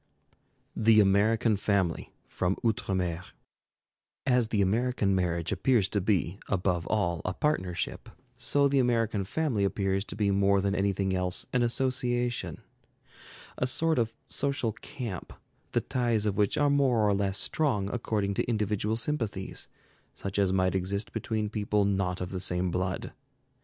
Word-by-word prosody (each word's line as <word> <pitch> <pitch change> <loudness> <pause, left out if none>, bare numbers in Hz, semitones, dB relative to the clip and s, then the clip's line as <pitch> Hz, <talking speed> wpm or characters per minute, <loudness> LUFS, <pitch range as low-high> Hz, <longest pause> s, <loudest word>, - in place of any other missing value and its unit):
THE 110 0 +5
AMERICAN 105 +2 +3
FAMILY 95 -4 0 0.2
From 90 +1 -1
'Outre 105 -3 0
Mer' 90 -2 -1 1.0
As 125 -3 +3
the 110 -2 -1
American 105 +1 +1
marriage 85 -3 0
appears 120 -8 +2
to 100 - 0
be 95 -1 0
above 90 -3 0
all 85 -6 0
a 90 - -2
partnership, 95 - -2 0.3
so 140 0 +2
the 140 0 +2
American 115 -5 +1
family 125 -2 0
appears 95 0 0
to - - -7
be 105 -2 +1
more 100 0 +3
than 100 0 0
anything 95 -1 0
else 90 -1 -1
an 125 - +2
association, 120 -1 0 1.0
a 130 - +1
sort 160 +3 +1
of 115 -1 -1
social 140 -4 0
camp, 115 - -7 0.4
the - - +2
ties 120 -4 0
of 105 -2 0
which 105 -1 +1
are 145 -1 +3
more 130 -6 +3
or 100 - +3
less 100 0 0
strong 125 -11 0
according 105 -4 -1
to 100 - -1
individual 105 -1 0
sympathies, 115 -7 -3 0.5
such 100 +1 -3
as 95 -2 +3
might 95 -1 +2
exist 95 +2 -2
between 110 -2 -2
people 105 -1 0
not 95 -2 0
of 90 0 -4
the 95 - -3
same 90 0 0
blood. 90 +1 -2
105 Hz, 150 wpm, -29 LUFS, 95-120 Hz, 1.0 s, THE